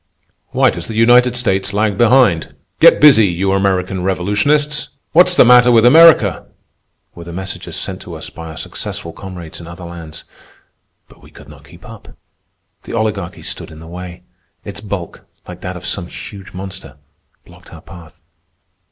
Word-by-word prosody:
"Why - - +2
does - - -7
the 110 - -7
United 120 +2 +4
States 100 -5 -1
lag 105 0 0
behind?"; 120 -7 +2 0.2
"Get - - +6
busy, 130 -8 +6
you 95 +2 -1
American 95 -1 0
revolutionists!"; 105 +12 0 0.2
"What's 180 +2 +4
the - - +6
matter 125 0 +6
with 115 -1 +4
America?"—were 125 - +2
the 85 - -10
messages 95 +2 -7
sent - - -6
to - - -9
us - - -9
by 80 0 -10
our 80 - -10
successful 85 - -7
comrades 90 -3 -10
in 85 - -11
other 85 +1 -10
lands. 85 -2 -10 0.8
But - - -21
we - - -17
could 70 - -16
not 75 -1 -16
keep 85 +4 -16
up. 115 -2 -14 0.6
The - - -10
Oligarchy 105 -6 -3
stood - - -7
in 80 - -13
the 80 - -12
way. 90 +1 -10 0.4
Its 100 0 -8
bulk, 100 -5 -7 0.2
like 90 0 -10
that 90 0 -6
of 90 - -11
some 85 0 -4
huge 100 +1 -10
monster, 95 -6 -9 0.5
blocked - - -18
our - - -12
path. 85 -1 -15
95 Hz, 165 wpm, -16 LUFS, 85-115 Hz, 0.8 s, Get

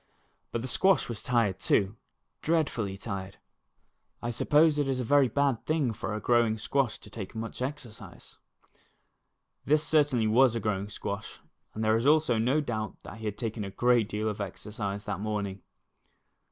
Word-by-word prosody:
But 115 - -2
the - - -3
squash 190 +7 +3
was 115 -3 -4
tired, 115 -6 +1
too, 100 +1 +2 0.5
dreadfully 130 -12 0
tired. 100 -2 -6 0.8
I 120 - -3
suppose 150 +5 +3
it 145 - +1
is 130 -1 0
a - - -1
very 140 +2 +4
bad 135 0 +1
thing 155 -7 +1
for 105 0 -4
a - - -2
growing 115 0 +2
squash 130 +2 0
to - - -14
take 100 -2 -7
much 115 +2 -5
exercise. 130 -4 -7 1.2
This 150 +2 +3
certainly 145 -7 +3
was 120 +2 +4
a - - 0
growing 100 -2 -2
squash, 100 0 -6 0.4
and 110 - -2
there 110 0 +3
is 115 +4 +1
also 150 -6 +4
no 130 +7 +2
doubt 110 -6 -4
that 110 - -10
he 110 - -7
had 105 -1 -3
taken 110 -2 -3
a 100 - -4
great 120 +1 +2
deal 105 +1 -2
of 105 -1 -3
exercise 100 +1 -5
that 95 - -3
morning. 100 -2 -3
115 Hz, 170 wpm, -29 LUFS, 105-135 Hz, 1.2 s, very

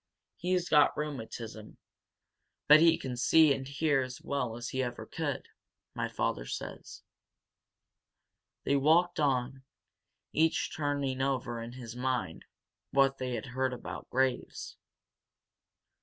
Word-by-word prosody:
He's 180 0 0
got 150 -3 +4
rheumatism, 115 -7 -6 0.9
but 150 +1 +9
he 165 0 +6
can 130 -2 -5
see 150 +4 +5
and 135 -1 -5
hear 140 0 +1
as 130 0 -5
well 125 -5 -2
as 120 0 -5
he 130 - -1
ever 120 -1 -4
could, - - -4 0.5
my - - -2
father - - -2
says." - - -7 1.6
They 140 - +2
walked 165 +5 +3
on, 135 -2 0 0.7
each 160 +1 +1
turning 140 -3 -1
over 130 -3 -1
in 115 +1 -7
his 120 -2 -8
mind 125 -9 -2 0.4
what 135 0 +3
they 125 -1 -2
had 110 - -4
heard 130 +1 -1
about 125 - -7
Graves. 130 0 -1
130 Hz, 125 wpm, -31 LUFS, 125-145 Hz, 1.6 s, but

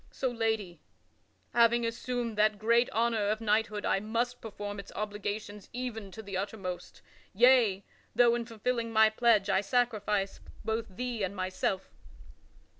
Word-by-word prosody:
So, 260 - -2
lady, 220 -6 -1 0.7
having 235 0 +4
assumed 235 0 -3
that 210 0 +3
great 235 +3 +3
honor 225 -2 +1
of 215 +1 0
knighthood 215 -1 0
I - - +2
must 235 +4 -2
perform 205 -2 -6
its 200 - -9
obligations 210 0 -4
even 235 -5 -4
to 220 - -8
the 200 -2 -6
uttermost; 190 -3 -5 0.3
yea, 230 -4 +5 0.3
though 240 -1 +6
in 235 -1 -2
fulfilling 230 +1 -2
my 220 -1 +5
pledge 220 -3 +3
I 195 -1 +3
sacrifice 210 -3 0 0.3
both 225 0 -1
Thee 240 +3 -4
and 195 +1 -2
myself." 185 0 -2
220 Hz, 140 wpm, -30 LUFS, 205-235 Hz, 0.7 s, though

